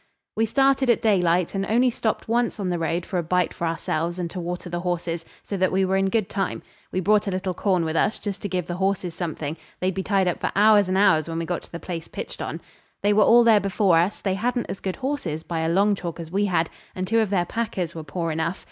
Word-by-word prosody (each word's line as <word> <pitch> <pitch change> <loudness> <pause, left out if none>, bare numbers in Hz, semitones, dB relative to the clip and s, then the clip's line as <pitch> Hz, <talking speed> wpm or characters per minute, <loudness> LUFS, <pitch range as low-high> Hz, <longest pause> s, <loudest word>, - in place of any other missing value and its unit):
We 225 0 +2
started 270 +1 +3
at 235 - +3
daylight, 180 -5 +2
and 195 -1 -1
only 245 +5 +3
stopped 220 -1 -2
once 235 0 0
on 190 -2 -1
the 175 -1 -1
road 165 +1 -1
for 185 - -2
a - - -1
bite 180 +2 +1
for 170 - -2
ourselves 165 +1 -2
and 175 -2 -3
to 185 - -5
water 175 +1 -4
the 175 0 -3
horses, 175 -2 -2 0.2
so 200 - -4
that 185 0 +2
we 190 0 +2
were 190 +1 +1
in 195 0 +2
good 215 -1 +1
time. 195 -1 -2 0.3
We 185 - -1
brought 210 +3 +3
a - - +2
little 185 0 -2
corn 185 -3 +1
with 160 0 -2
us, 205 - +2
just 200 -2 -5
to 205 - -3
give 180 -2 -1
the 175 0 -4
horses 190 -2 0
something; 160 -3 -4 0.2
they'd 185 +1 0
be 190 - -2
tied 195 -1 +1
up 180 - -1
for - - -1
hours 205 -1 +5
and 185 - +1
hours 170 -6 +4
when 165 - -3
we 165 - -2
got 175 +1 -2
to - - -17
the 170 - -6
place 170 -3 -6
pitched - - -7
on. - - -4 0.4
They 205 +1 +4
were 210 - +4
all 235 +3 +7
there 225 -2 +6
before 195 -3 +3
us; 180 +5 0
they 195 - 0
hadn't 240 +5 -1
as - - -6
good 190 -1 -3
horses 255 - -3
by 165 -1 -3
a 160 0 0
long 200 +4 +3
chalk 175 -3 -5
as 165 -1 -7
we 200 +2 +1
had, 175 -4 0 0.2
and 185 0 -3
two 225 +3 +3
of 220 -3 +1
their 185 -3 +1
packers 185 -5 -3
were 160 - -6
poor 165 +2 -3
enough. 160 +3 -2
185 Hz, 265 wpm, -24 LUFS, 170-205 Hz, 0.4 s, all